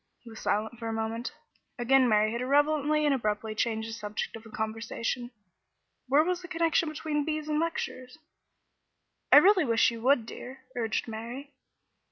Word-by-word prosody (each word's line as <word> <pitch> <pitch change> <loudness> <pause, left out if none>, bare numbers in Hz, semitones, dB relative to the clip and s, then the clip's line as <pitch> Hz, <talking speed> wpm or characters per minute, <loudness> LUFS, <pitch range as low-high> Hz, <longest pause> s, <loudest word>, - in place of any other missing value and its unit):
He 235 - -12
was 220 - -10
silent 220 +3 -1
for 230 - -5
a 225 - -2
moment. 225 +2 -3 0.5
Again 255 +1 +4
Mary 215 0 +3
had 235 +1 -3
irrelevantly 295 +3 +2
and 290 - +3
abruptly 215 -3 -1
changed 220 0 -1
the 225 - -6
subject 210 -1 -4
of 225 -1 -11
conversation. 225 +2 -3 0.8
Where 280 +4 +5
was 360 +1 -1
the 355 - -9
connection 330 -2 +1
between 300 -1 -2
bees 310 0 -3
and 305 0 0
lectures? 300 -5 -3 1.1
"I - - +10
really 385 -2 +6
wish 230 -2 +3
you 230 -1 -7
would, 255 -1 +3
dear," 260 +3 -9
urged 225 -2 -1
Mary. 240 +6 -7
245 Hz, 165 wpm, -29 LUFS, 225-300 Hz, 1.1 s, I